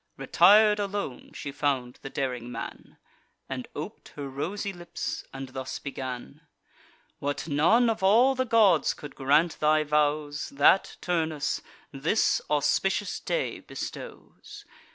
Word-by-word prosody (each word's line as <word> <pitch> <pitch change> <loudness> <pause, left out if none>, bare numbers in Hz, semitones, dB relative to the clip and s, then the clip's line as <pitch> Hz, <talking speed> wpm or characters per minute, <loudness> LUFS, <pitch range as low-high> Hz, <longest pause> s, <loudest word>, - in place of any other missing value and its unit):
Retir'd 210 +4 +5
alone 200 -10 -4
she 140 - -5
found 135 -4 -1
the 135 - -7
daring 125 -4 -3
man, 115 - -8 0.5
And - - -5
op'd - - -8
her 140 -1 -5
rosy 185 +9 -4
lips, 175 -1 -5
and 135 0 -7
thus 130 0 -5
began: 130 - -6 0.8
"What 145 +1 -3
none 170 +12 +4
of 225 -3 0
all 230 +8 +5
the 260 0 0
gods 220 -9 +4
could 145 - -10
grant 150 +5 +2
thy 155 0 +3
vows, 150 0 0
That, 145 +7 +4
Turnus, 160 -4 -1 0.3
this 155 +10 +1
auspicious 190 +7 +1
day - - -2
bestows. - - -9
150 Hz, 125 wpm, -27 LUFS, 140-195 Hz, 0.8 s, Retir'd